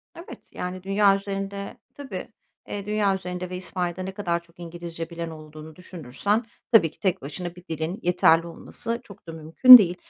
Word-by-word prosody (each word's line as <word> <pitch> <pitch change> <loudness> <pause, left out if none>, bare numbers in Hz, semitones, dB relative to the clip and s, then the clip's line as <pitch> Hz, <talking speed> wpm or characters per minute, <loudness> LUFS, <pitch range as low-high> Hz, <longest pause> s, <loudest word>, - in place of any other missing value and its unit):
Evet, 335 - -12
yani, 180 0 -6
dünya 195 +1 +3
üzerinde 200 0 -5 0.2
Tabii. 285 -2 -7 0.4
Eee, 200 -1 -5
dünya 210 -1 +1
üzerinde 180 -1 -5
ve 180 - -5
İspanya'da 180 -1 -2
ne 190 - -5
kadar 175 -3 -2
çok 170 0 -25
İngilizce 170 -1 -7
bilen 170 -1 -5
olduğunu 155 0 -11
düşünürsen 180 - -2 0.3
tabii 190 -10 +5
ki - - -27
tek 190 -3 0
başına 170 +5 -6
bir 180 0 -15
dilin 160 +4 -3
yeterli 170 -1 +4
olması 230 +7 -5
çok 200 -5 -16
da - - -6
mümkün 165 +11 +9
değil. 180 -6 0
180 Hz, 170 wpm, -25 LUFS, 165-200 Hz, 0.4 s, mümkün